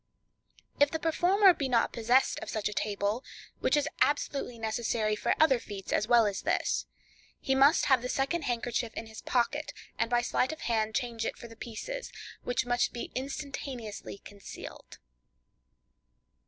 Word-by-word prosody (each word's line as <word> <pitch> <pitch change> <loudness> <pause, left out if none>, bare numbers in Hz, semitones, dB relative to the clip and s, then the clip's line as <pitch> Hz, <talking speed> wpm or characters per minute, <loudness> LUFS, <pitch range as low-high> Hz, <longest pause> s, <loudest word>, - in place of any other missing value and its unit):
If 285 0 +6
the 320 - -2
performer 360 +5 +4
be 280 -5 -2
not 235 -2 +2
possessed 240 +3 +3
of - - -7
such 215 -2 -1
a 210 - -3
table 205 +3 -1 0.4
(which - - +2
is 295 - +1
absolutely 280 -4 +1
necessary 220 -1 0
for - - +1
other 275 -5 +5
feats 200 -4 -6
as 210 - +1
well 240 -2 +6
as 200 -2 -1
this), - - 0 0.5
he 265 - 0
must 275 +5 +5
have 265 -3 +4
the 250 - -4
second 280 +5 0
handkerchief 240 -1 -2
in - - -4
his 220 0 -10
pocket, 275 +5 0 0.3
and - - +1
by 240 0 +2
sleight 255 +3 +1
of 315 - -8
hand 220 -2 0
change 235 -3 -2
it - - -3
for 235 - -9
the 230 - -13
pieces, - - -6 0.3
which 245 +1 0
must 245 0 +1
be 240 - -5
instantaneously 265 -6 -5
concealed. 200 -1 -10
245 Hz, 165 wpm, -30 LUFS, 225-280 Hz, 0.5 s, If